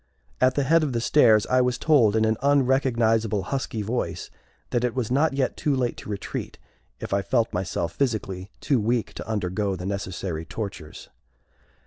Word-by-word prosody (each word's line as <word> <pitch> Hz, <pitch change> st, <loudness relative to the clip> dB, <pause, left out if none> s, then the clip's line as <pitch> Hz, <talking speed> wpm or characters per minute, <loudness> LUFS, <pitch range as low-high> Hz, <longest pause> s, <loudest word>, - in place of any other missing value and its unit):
At 130 Hz, 0 st, +4 dB
the 145 Hz, -, +1 dB
head 165 Hz, +5 st, +4 dB
of 145 Hz, -4 st, -1 dB
the 120 Hz, -, 0 dB
stairs 115 Hz, -4 st, +4 dB
I 130 Hz, 0 st, +3 dB
was 125 Hz, -1 st, +1 dB
told 120 Hz, -9 st, +4 dB
in 110 Hz, 0 st, +3 dB
an 110 Hz, 0 st, +2 dB
unrecognizable, 120 Hz, -6 st, +2 dB
husky 115 Hz, -1 st, -3 dB
voice, 120 Hz, +4 st, -3 dB, 0.4 s
that 120 Hz, -, 0 dB
it 125 Hz, -2 st, -1 dB
was 125 Hz, -3 st, -2 dB
not 145 Hz, +3 st, +2 dB
yet 135 Hz, -1 st, 0 dB
too 145 Hz, -2 st, 0 dB
late 125 Hz, -2 st, -1 dB
to -, -, -10 dB
retreat 100 Hz, -1 st, -5 dB, 0.4 s
if -, -, -5 dB
I 100 Hz, -, +2 dB
felt 115 Hz, +3 st, 0 dB
myself 85 Hz, -2 st, -2 dB
physically 100 Hz, -7 st, -2 dB
too 140 Hz, -4 st, +2 dB
weak 115 Hz, +2 st, -1 dB
to -, -, -8 dB
undergo 100 Hz, -1 st, -1 dB
the 90 Hz, 0 st, -7 dB
necessary 95 Hz, -4 st, -4 dB
tortures. 90 Hz, -4 st, -7 dB
115 Hz, 175 wpm, -25 LUFS, 100-130 Hz, 0.4 s, At